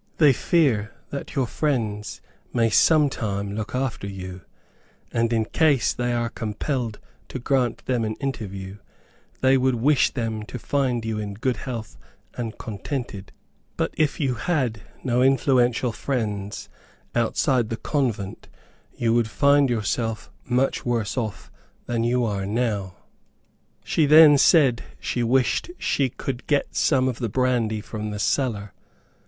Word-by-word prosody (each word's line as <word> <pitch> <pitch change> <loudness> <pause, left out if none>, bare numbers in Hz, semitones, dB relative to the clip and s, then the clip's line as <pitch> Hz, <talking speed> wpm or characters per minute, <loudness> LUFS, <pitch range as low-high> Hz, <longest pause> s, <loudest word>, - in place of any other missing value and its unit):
They 150 -4 +6
fear 120 -9 +1 0.2
that 140 - -6
your 135 -2 +2
friends 115 -7 -2 0.3
may 115 -2 +2
sometime 105 -9 +2
look 110 +3 -4
after 125 -6 -2
you; 95 -2 -7 0.7
and, 115 0 +1
in 110 -2 +1
case 145 -4 +2
they 120 0 -1
are 120 -1 0
compelled 115 +1 -3 0.3
to - - -6
grant 125 -2 0
them 125 -3 0
an 110 0 -2
interview, 100 -7 -5 0.6
they 130 +1 +5
would 130 -1 +2
wish 130 +3 +3
them 115 -3 -3
to - - -6
find 125 -1 -1
you 110 -1 -2
in 100 -2 -5
good 125 +4 -1
health 115 -5 -6 0.3
and 115 -2 -5
contented; 110 -2 -5 0.5
but - - -1
if 155 -2 +1
you 135 -5 +1
had 125 - -1 0.2
no 125 -1 +1
influential 130 -2 +3
friends 105 -6 -3 0.5
outside 120 0 +1
the 115 - -3
convent, 115 -10 -2 0.5
you 115 -1 +1
would 115 -1 +2
find 140 +2 +4
yourself 115 0 -2
much 125 +2 0
worse 115 -4 -1
off 110 -5 -4 0.3
than 115 -1 -1
you 120 +1 +2
are 100 -3 -2
now." 105 -4 -1 0.9
She 155 - +2
then 150 -1 +8
said 135 -6 +5 0.2
she 120 - -2
wished 125 - +1
she 135 -2 +1
could 125 +1 -5
get 145 -2 0
some 130 -3 +3
of 125 -2 -2
the 120 -3 -2
brandy 120 -3 +1
from 105 0 -5
the 105 - -4
cellar. 105 -3 -1
120 Hz, 140 wpm, -24 LUFS, 110-130 Hz, 0.9 s, then